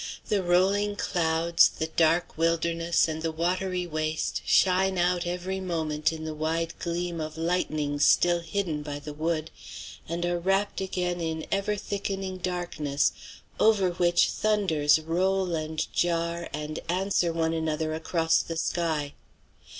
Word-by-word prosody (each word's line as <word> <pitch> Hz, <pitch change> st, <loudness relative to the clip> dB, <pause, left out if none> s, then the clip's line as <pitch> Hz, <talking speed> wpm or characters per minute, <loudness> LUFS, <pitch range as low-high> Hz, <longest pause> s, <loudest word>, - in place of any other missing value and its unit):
The 205 Hz, -2 st, +2 dB
rolling 195 Hz, +3 st, +2 dB
clouds, 165 Hz, -3 st, +3 dB
the 160 Hz, -, -3 dB
dark 165 Hz, +1 st, +1 dB
wilderness, 165 Hz, +1 st, +1 dB
and 160 Hz, 0 st, -4 dB
the 165 Hz, 0 st, -1 dB
watery 180 Hz, +2 st, -1 dB
waste 155 Hz, -1 st, -2 dB
shine 190 Hz, 0 st, +3 dB
out 175 Hz, 0 st, +1 dB
every 180 Hz, +2 st, -3 dB
moment 160 Hz, -4 st, -1 dB
in 160 Hz, -1 st, -6 dB
the 155 Hz, -, -4 dB
wide 160 Hz, +2 st, -1 dB
gleam 170 Hz, -1 st, -3 dB
of 155 Hz, 0 st, -5 dB
lightnings 155 Hz, -4 st, 0 dB
still 175 Hz, +3 st, +4 dB
hidden 170 Hz, -2 st, -2 dB
by 145 Hz, -1 st, -5 dB
the 145 Hz, +1 st, -8 dB
wood, 160 Hz, +1 st, -2 dB, 0.6 s
and 170 Hz, +1 st, -2 dB
are 175 Hz, 0 st, 0 dB
wrapped 195 Hz, +3 st, 0 dB
again 180 Hz, -2 st, -2 dB
in 160 Hz, -1 st, -3 dB
ever 200 Hz, +1 st, 0 dB
thickening 195 Hz, -2 st, -4 dB
darkness 175 Hz, -6 st, -1 dB, 0.5 s
over 205 Hz, -4 st, +4 dB
which 175 Hz, 0 st, +3 dB
thunders 190 Hz, -9 st, +2 dB
roll 180 Hz, +3 st, 0 dB
and 155 Hz, 0 st, -2 dB
jar, 170 Hz, 0 st, 0 dB
and 150 Hz, +1 st, -4 dB
answer 180 Hz, -1 st, +1 dB
one 165 Hz, 0 st, 0 dB
another 160 Hz, -1 st, -1 dB
across 160 Hz, +1 st, +1 dB
the 165 Hz, -, -5 dB
sky. 160 Hz, -4 st, -1 dB
170 Hz, 140 wpm, -27 LUFS, 160-180 Hz, 0.6 s, still